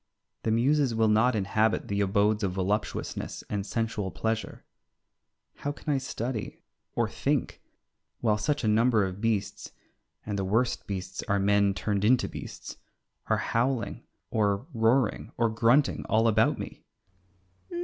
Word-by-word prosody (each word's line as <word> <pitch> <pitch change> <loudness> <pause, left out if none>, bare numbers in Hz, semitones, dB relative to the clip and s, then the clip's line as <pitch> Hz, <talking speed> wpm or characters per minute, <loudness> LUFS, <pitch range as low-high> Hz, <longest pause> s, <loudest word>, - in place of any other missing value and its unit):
The - - -1
muses 130 +2 +2
will 110 0 +3
not 110 +3 +4
inhabit 110 +2 +1
the 100 0 0
abodes 105 +2 +2
of 95 -3 -1
voluptuousness 95 +3 -2
and 100 -1 -1
sensual 115 -4 -2
pleasure. 110 +3 -3 0.9
How 145 - -3
can 145 0 -3
I 135 - +1
study 120 -3 -4 0.3
or 120 -2 +2
think 115 +5 -1 0.6
while 105 -3 +1
such 145 +5 0
a - - +1
number 110 -1 +4
of 95 +1 -6
beasts 115 -3 -2 0.5
and 105 -2 -2
the - - 0
worst 110 +6 0
beasts 95 -2 -4
are 100 - +2
men 100 0 +3
turned 100 +1 -1
into 120 +4 +4
beasts - - -8 0.5
are - - +2 0.2
howling 120 -2 0 0.3
or 105 +1 +1
roaring 115 +1 +1
or 115 -1 +2
grunting 120 +5 +3
all 110 +1 +3
about 110 0 +3
me? - - -8
110 Hz, 140 wpm, -28 LUFS, 100-120 Hz, 0.9 s, not